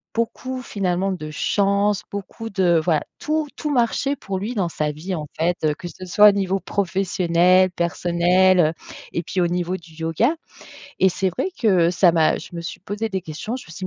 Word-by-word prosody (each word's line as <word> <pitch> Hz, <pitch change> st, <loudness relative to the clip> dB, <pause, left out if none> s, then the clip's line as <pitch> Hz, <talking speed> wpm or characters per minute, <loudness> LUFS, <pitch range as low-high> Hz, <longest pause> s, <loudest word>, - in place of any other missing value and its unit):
beaucoup, 255 Hz, +3 st, -3 dB
finalement, 195 Hz, -3 st, -1 dB
de 155 Hz, -4 st, -5 dB
chance, 200 Hz, +4 st, +1 dB
beaucoup 200 Hz, +3 st, -6 dB
de 180 Hz, -5 st, +3 dB
voilà, 160 Hz, -4 st, +1 dB, 0.2 s
tout, 310 Hz, 0 st, -1 dB
tout 300 Hz, -, -3 dB
marchait 275 Hz, +2 st, +1 dB
pour 195 Hz, -6 st, -5 dB
lui, 225 Hz, +5 st, -4 dB
dans 185 Hz, -4 st, 0 dB
sa 150 Hz, -2 st, -2 dB
vie, 175 Hz, +6 st, -5 dB
en 155 Hz, -4 st, -4 dB
fait, 170 Hz, +2 st, +1 dB
heu, 150 Hz, -, +2 dB
que 175 Hz, -, -8 dB
ce 185 Hz, -, -10 dB
soit 205 Hz, +4 st, +7 dB
au -, -, +5 dB
niveau 195 Hz, -1 st, -1 dB
professionnel, 185 Hz, -1 st, +2 dB
personnel, 175 Hz, +2 st, +2 dB
heu 155 Hz, +1 st, +2 dB, 0.4 s
et 170 Hz, -, -2 dB
puis 180 Hz, +2 st, -2 dB
au 175 Hz, -, +3 dB
niveau 180 Hz, +1 st, -1 dB
du 165 Hz, -2 st, -17 dB
yoga 165 Hz, -, 0 dB, 0.7 s
et 190 Hz, -, +5 dB
c'est 190 Hz, +1 st, -1 dB
vrai 260 Hz, -, -2 dB
que 185 Hz, -7 st, +3 dB
ça 180 Hz, -1 st, +4 dB
m'a 160 Hz, -2 st, +3 dB
je -, -, -9 dB
me 170 Hz, -, -4 dB
suis 170 Hz, -, -7 dB
posée 205 Hz, +3 st, -3 dB
des 190 Hz, -3 st, -3 dB
questions, 180 Hz, +10 st, -5 dB
je -, -, -10 dB
me -, -, -14 dB
suis 185 Hz, +2 st, -5 dB
185 Hz, 205 wpm, -22 LUFS, 170-205 Hz, 0.7 s, soit